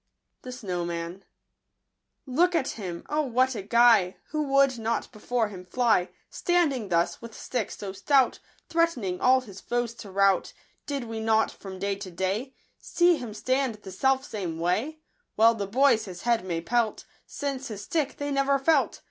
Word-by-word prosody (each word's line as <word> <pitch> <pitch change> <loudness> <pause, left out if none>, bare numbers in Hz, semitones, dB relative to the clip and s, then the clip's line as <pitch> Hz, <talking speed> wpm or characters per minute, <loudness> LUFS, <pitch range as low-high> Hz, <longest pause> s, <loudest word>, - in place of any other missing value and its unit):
Jbnofcmaiu 180 -7 -4 1.0
Look 340 +7 +2
at 290 -5 +1
him, 180 -6 -6
O 300 +1 +1
what 260 -1 +1
a 215 - -4
Guy! 220 -3 +4
Who 305 0 -1
would 275 -2 +3
not 225 +1 -2
before 225 0 -1
him 185 -3 -9
fly, 220 -1 +2 0.2
Standing 295 - +1
thus, 170 -1 +1
with 230 -1 -10
stick 240 -6 -3
so 195 -2 -7
stout, 260 +6 +2 0.3
Threatening 310 - 0
all 260 +1 +5
his 200 -6 -11
foes 240 -1 -2
to 220 -3 -11
rout, 195 0 +2 0.3
Did 280 -3 -2
we 225 -1 -5
not, 220 0 +2
from 190 -1 -9
day 200 +1 -1
to 200 -1 -7
day, 195 +9 -3 0.2
See 345 -1 +3
him 230 -6 -7
stand 255 +1 0
the 205 -2 -11
self 265 +7 +1
same 185 - -4
way? 220 - -1 0.4
Well 225 +1 +6
the 205 -3 -4
boys 240 0 +3
his 180 -3 -9
head 235 -3 +2
may 170 -3 -3
pelt, 230 +4 0 0.2
Since 275 -2 -4
his 205 -2 -7
stick 295 +5 -1
they 285 0 -3
never 275 0 +2
felt.' 310 +4 +2
230 Hz, 165 wpm, -27 LUFS, 195-270 Hz, 1.0 s, Well